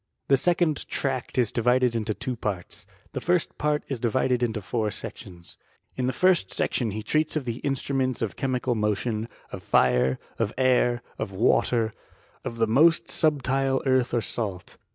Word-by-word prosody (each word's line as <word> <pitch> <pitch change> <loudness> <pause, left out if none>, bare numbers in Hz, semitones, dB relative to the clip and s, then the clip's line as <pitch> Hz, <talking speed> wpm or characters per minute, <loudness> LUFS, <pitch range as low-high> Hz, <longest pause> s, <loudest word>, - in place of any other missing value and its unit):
The 135 - +7
second 170 +1 +1
tract 130 -3 -2
is 120 -4 +2
divided 125 +1 +2
into 110 -2 -2
two 130 - -3
parts. 100 -5 -5 0.3
Thefiiit 175 -1 +1
nart 150 0 +1
is 135 - -2
subdivided 125 +1 +1
into 115 -3 0
four 110 +2 -1
sections. 85 -3 -8 0.4
In 125 -1 -1
the - - +1
^xit 180 - +3
tOEOS; 100 - -7
IK - - +1
CBSUIIIBI. 120 - 0
EectioH - - -7
he 110 +1 -4
treats 155 +8 0
of 150 -4 -1
the 120 -1 -3
instruments 135 -2 -1
of 110 - -3
chemical 130 -2 -1
mo 105 -2 +1
tion, 110 +1 -3 0.2
of - - -6
fire, 65 +1 +3 0.2
of 110 -2 0
air, 125 -2 +2 0.2
of - - -3
water, 110 +2 +2 0.5
of 115 - -5
the 115 - +3
most 155 +9 +4
subtile 135 -3 +1
earth 130 -2 +2
or 120 - +2
salt. 100 -6 -4
125 Hz, 175 wpm, -26 LUFS, 110-135 Hz, 0.5 s, The